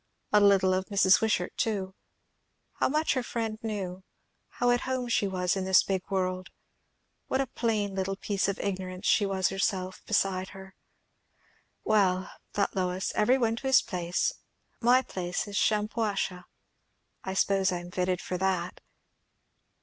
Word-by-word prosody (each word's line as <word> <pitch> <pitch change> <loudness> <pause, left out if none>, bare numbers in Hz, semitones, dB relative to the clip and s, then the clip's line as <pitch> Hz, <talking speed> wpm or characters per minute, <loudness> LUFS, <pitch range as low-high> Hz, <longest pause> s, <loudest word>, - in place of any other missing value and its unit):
A 210 - +7
little 195 -2 +5
of 185 0 0
Mrs. 195 -2 +4
Wishart 210 -5 0
too. 195 -4 -1 0.9
How - - +2
much 305 +3 +1
her 260 - 0
friend 225 -3 -3
knew, 190 -4 -4 0.5
how 245 0 +2
at 245 - +2
home 255 -2 -2
she 210 -3 +2
was 180 -1 0
in 190 - -2
this 190 0 +5
big 190 -2 -1
world! 185 -1 -1 0.8
what 265 - 0
a 270 - +2
plain 220 -5 -1
little 190 0 -2
piece 200 0 -1
of 200 - -2
ignorance 185 -2 -3
was 195 -2 -1
she - - -6
herself 190 -1 -1
beside 190 -3 0
her. 190 0 -11 1.1
Well, 190 -4 +2 0.2
thought 200 - -1
Lois 185 0 -1
every 245 +5 +3
one 230 -3 0
to 265 - -4
his 265 -1 +5
place! 175 -1 -1 0.5
My 250 +2 +4
place 180 -3 -3
is 205 - -7
Shampuashuh. 210 -4 0 0.8
I 190 - -4
suppose 195 0 +2
I 180 - -1
am 175 0 -10
fitted 180 0 -1
for 180 - -4
that. 185 -2 -1
195 Hz, 155 wpm, -28 LUFS, 185-215 Hz, 1.1 s, A